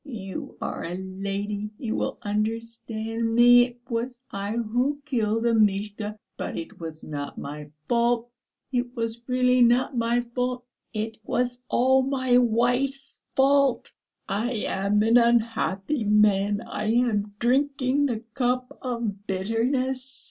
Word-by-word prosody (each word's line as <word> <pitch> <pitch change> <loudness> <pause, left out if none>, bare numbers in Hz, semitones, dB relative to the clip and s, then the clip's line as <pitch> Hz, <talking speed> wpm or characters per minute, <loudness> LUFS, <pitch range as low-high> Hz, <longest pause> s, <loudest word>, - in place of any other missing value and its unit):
"You 205 - -7
are - - -4
a 170 +2 -4
lady, 200 +2 -4
you 230 -4 -3
will - - -2
understand 225 +1 -2
me.... 245 +1 +8
It 245 -1 -17
was 240 +2 -3
I 200 +1 -3
who 245 +5 0
killed 225 -5 0
Amishka.... 210 -1 +1 0.2
But - - -4
it 165 - -7
was 160 -2 -7
not 145 -2 -5
my 150 +1 -7 0.2
fault.... 235 0 +1 0.4
It 245 0 -1
was 230 0 -3
really 250 0 +3
not 245 +3 +4
my 235 +1 +2
fault.... 250 +1 -3 0.3
It 220 0 -3
was 245 +2 -1
all 260 +2 +4
my 260 -2 +2
wife's 245 +4 0 0.2
fault. 275 -1 +3 0.4
I 220 +5 -1
am 200 +2 +1
an 230 +2 +6
unhappy 230 0 +1
man, 205 0 +3
I 215 - -5
am 215 -3 +1
drinking 275 +3 +2
the 230 -4 -2
cup 250 -1 0
of 230 -5 -3
bitterness!" 255 +7 -1
235 Hz, 130 wpm, -25 LUFS, 210-250 Hz, 0.4 s, me